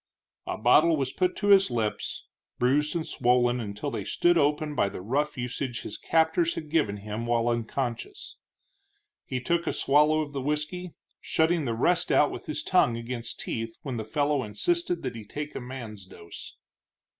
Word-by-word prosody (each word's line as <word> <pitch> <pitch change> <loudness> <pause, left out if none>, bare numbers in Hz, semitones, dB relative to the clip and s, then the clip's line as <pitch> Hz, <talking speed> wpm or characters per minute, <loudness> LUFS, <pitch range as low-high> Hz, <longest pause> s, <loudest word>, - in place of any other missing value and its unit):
A - - -2
bottle 155 +8 +5
was 135 -2 -2
put 180 -1 +1
to 205 - -1
his 195 -4 +7
lips, 115 -3 -3 0.3
bruised 145 +6 +2
and 165 -2 -1
swollen 125 -1 +2
until 105 +5 -4
they - - -3
stood 175 0 +2
open 150 0 +1
by 100 - +1
the - - -7
rough 140 +9 -1
usage 125 0 -3
his - - -6
captors 160 +1 +2
had 155 -2 -7
given 145 -11 +1
him 105 +3 -5
while 120 0 +1
unconscious. 120 - -3 0.9
He 130 - -3
took 170 +6 0
a - - +2
swallow 150 +2 +3
of 145 -1 -5
the 135 - -3
whisky, 150 +5 -3 0.3
shutting 160 -1 +1
the 115 -2 -1
rest 170 +9 +2
out 150 - +4
with - - -8 0.2
tongue 120 -11 +3
against 115 -1 -5
teeth 115 0 -4
when 130 -4 -4
the 110 - -3
fellow 145 +5 0
insisted 170 +11 -1
that 125 -3 -3
he 110 - -7
take 145 +8 -6
a - - -5
man's 115 -6 -8
dose. 85 -2 -11
135 Hz, 175 wpm, -27 LUFS, 115-155 Hz, 0.9 s, his